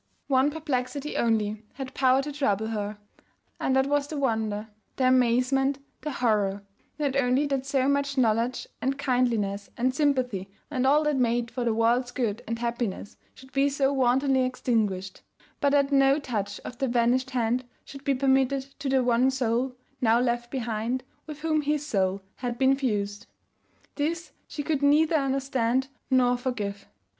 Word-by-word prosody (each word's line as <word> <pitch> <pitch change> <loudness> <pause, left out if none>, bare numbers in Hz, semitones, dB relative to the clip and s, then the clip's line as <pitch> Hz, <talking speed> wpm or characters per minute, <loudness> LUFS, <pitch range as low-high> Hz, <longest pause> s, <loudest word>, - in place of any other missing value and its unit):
One 270 +1 +3
perplexity 285 -2 -3
only 215 -2 +1
had 265 -1 -7
power 265 0 +3
to 295 - -4
trouble 220 -7 0
her, 210 -1 -3 0.6
and 265 - +1
that 265 0 +4
was 290 0 +1
the 305 - -5
wonder, 220 -5 -1 0.3
the 255 - +2
amazement, 255 +2 +3 0.2
the 305 - -3
horror, 210 -7 0 0.3
not 285 -3 -1
only 270 +1 +2
that 275 -2 -2
so 270 -2 +1
much 280 0 0
knowledge 235 0 +1 0.2
and 270 +2 0
kindliness 235 -7 0
and 255 +2 +1
sympathy 255 -9 0 0.2
and 260 -2 +1
all 295 +3 +4
that 300 -2 +1
made 240 -1 +1
for 245 +1 -3
the 235 -2 +1
world's 240 +2 +2
good 240 -3 -2
and 230 +1 -2
happiness 235 -4 -3 0.2
should 265 0 -15
be 275 +1 +2
so 275 0 +1
wantonly 265 +1 +3
extinguished; 215 -7 -1 0.4
but 285 - +3
that 280 0 +2
no 275 0 +5
touch 230 -9 -3
of 245 - -9
the 270 - +1
vanished 245 +2 +2
hand 245 -1 0 0.2
should 275 0 -11
be 280 -1 +1
permitted 270 0 +2 0.2
to 280 -1 -2
the 265 -1 +3
one 245 +1 +3
soul 250 0 0 0.3
(now 230 -1 +4
left 240 -1 0
behind) 240 0 -2 0.2
with 300 -1 -8
whom 310 -1 +1
his 295 0 -1
soul 195 -6 0
had 245 -1 -3
been 265 +2 +4
fused. 205 -5 -2 0.7
This 330 +3 -2 0.2
she 290 - -5
could 295 -2 -1
neither 305 +3 +4
understand 265 -2 0 0.2
nor 250 -2 +3
forgive. 210 -6 -4
255 Hz, 165 wpm, -27 LUFS, 230-275 Hz, 0.7 s, no